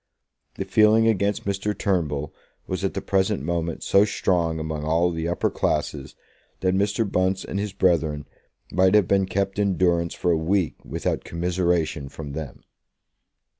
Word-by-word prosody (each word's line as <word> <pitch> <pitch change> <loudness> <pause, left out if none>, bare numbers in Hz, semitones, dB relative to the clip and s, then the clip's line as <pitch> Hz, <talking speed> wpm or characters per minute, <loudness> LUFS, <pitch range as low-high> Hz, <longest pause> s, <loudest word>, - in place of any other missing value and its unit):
The - - -4
feeling 110 +1 +4
against 100 -2 +1
Mr. 100 +1 -2
Turnbull 75 -7 -1 0.3
was 95 0 -4
at 95 - -1
the 95 - -3
present 95 -8 +1
moment 85 0 -2
so 100 - +5
strong 85 -5 0
among 80 -1 -4
all 85 +3 +2
the 80 0 -3
upper 85 - 0
classes, 70 -3 -2 0.5
that 95 0 +2
Mr. 100 +3 +1
Bunce 95 0 0
and 100 - -3
his 105 0 -2
brethren 80 -6 +1 0.5
might 95 +2 +4
have 105 -5 +4
been 95 -1 +2
kept 100 +1 -1
in 100 -3 +1
durance 85 -2 +1
for 90 - 0
a - - +3
week 85 +2 -1
without - - -3
commiseration 85 -4 -1
from 75 -1 -8
them. 75 -4 -7
90 Hz, 160 wpm, -24 LUFS, 80-100 Hz, 0.5 s, so